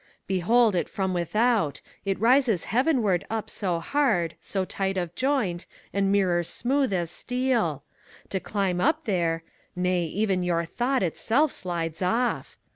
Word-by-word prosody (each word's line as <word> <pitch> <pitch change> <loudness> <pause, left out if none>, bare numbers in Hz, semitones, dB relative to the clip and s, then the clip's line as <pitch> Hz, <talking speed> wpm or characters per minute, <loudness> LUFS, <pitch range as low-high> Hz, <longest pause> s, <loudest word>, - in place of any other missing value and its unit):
Behold 210 +5 +3
it 175 - -1
from 190 -2 -1
without 205 - +1 0.3
I - - -2
It 195 - 0
rises 235 -5 +3
heavenward 235 - +2
up 220 -1 -3
So 180 -4 -1
hard, 185 - +1
so 190 -2 -2
tight 195 0 -2
of 175 -2 -2
joint, 240 -9 0 0.3
and 195 -1 +1
mirror 185 -4 +3
smooth 260 - 0
as 175 -3 -1
steel. 240 - 0 0.5
To 190 - -1
climb 185 -1 -1
up 310 - +1
there 170 -6 0 0.2
— - - -38
nay, 180 -1 +1
even 190 +2 0
your 170 -1 0
Thought 250 +7 0
itself 240 - +1
slides 170 -2 -3
off! 230 +7 0
195 Hz, 150 wpm, -26 LUFS, 175-240 Hz, 0.5 s, Behold